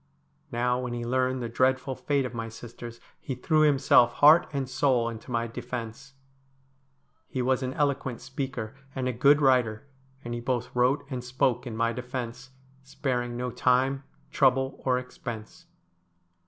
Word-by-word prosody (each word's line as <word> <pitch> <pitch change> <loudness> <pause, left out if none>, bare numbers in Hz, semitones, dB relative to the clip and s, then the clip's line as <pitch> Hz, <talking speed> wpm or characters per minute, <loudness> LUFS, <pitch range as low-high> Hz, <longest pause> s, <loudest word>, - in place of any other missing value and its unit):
Now, 125 +1 +1
when 125 -1 -4
he 120 0 -4
learned 130 +1 0
the - - -2
dreadful 130 +3 +1
fate 140 0 0
of 125 - -5
my 115 -1 -4
sisters, 120 +1 -10 0.2
he 130 - -5
threw 155 +5 +2
himself 135 -5 +5
heart 155 +4 +6
and 140 -3 -2
soul 125 -2 +2
into 115 +2 -7
my 115 -1 0
defence. 120 +3 -7 1.1
He 130 - -2
was 130 +1 +1
an 130 0 -3
eloquent 140 -4 -1
speaker, 130 -3 -5 0.2
and 130 -2 -1
a 130 - -1
good 140 +5 +5
writer, 125 -4 +2 0.4
and 120 - -4
he 120 - -3
both 125 0 -2
wrote 130 +4 +2
and 125 -2 -3
spoke 125 0 0
in 110 -2 -5
my 115 0 +1
defence, 125 0 -6 0.3
sparing 125 -3 -3
no 125 0 -3
time, 130 +3 +2 0.3
trouble, 135 0 +2
or 130 -1 +2
expense. 120 -3 -8
125 Hz, 155 wpm, -27 LUFS, 120-135 Hz, 1.1 s, heart